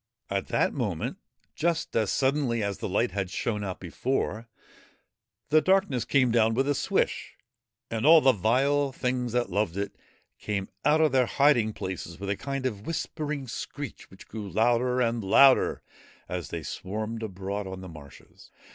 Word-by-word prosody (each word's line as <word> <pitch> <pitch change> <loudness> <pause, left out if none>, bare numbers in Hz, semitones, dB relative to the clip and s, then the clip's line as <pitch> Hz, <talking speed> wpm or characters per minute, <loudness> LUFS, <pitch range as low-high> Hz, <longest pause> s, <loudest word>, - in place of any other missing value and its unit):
At 100 0 -1
that - - +1
moment, - - -3 0.3
just 165 0 -1
as 110 -3 +2
suddenly 130 -4 +1
as 100 -1 -3
the - - -3
light 115 +6 +1
had 100 -2 -2
shone 105 +1 -2
out 95 -2 -4
before, 110 - -2 1.0
the 155 +2 +5
darkness 190 - +2
came 130 -4 +3
down 115 -1 +3
with 135 +3 +1
a 145 - +3
swish, - - -1 0.6
and 115 -1 -2
all 160 +2 +8
the 135 -3 +5
vile 135 +7 +2
things 125 -2 -2
that 120 -1 0
loved 100 -2 0
it 100 0 -3 0.4
came 100 -2 -3
out 150 +2 +4
of 155 -2 +4
their 130 -2 +3
hiding 135 -6 +3
places 90 -4 -6
with 100 0 -3
a - - 0
kind 135 +3 -4
of 105 -5 -3
whispering 150 -4 -3
screech 140 +3 -7
which 95 - -15
grew 105 -3 -6
louder 120 +4 +2
and 115 -2 0
louder 130 +7 +5 0.4
as 90 -1 -4
they - - -5
swarmed 110 +3 -4
abroad 100 -1 -4
on 95 0 -7
the 95 - -8
marshes. 75 -5 -14
115 Hz, 165 wpm, -27 LUFS, 100-135 Hz, 1.0 s, all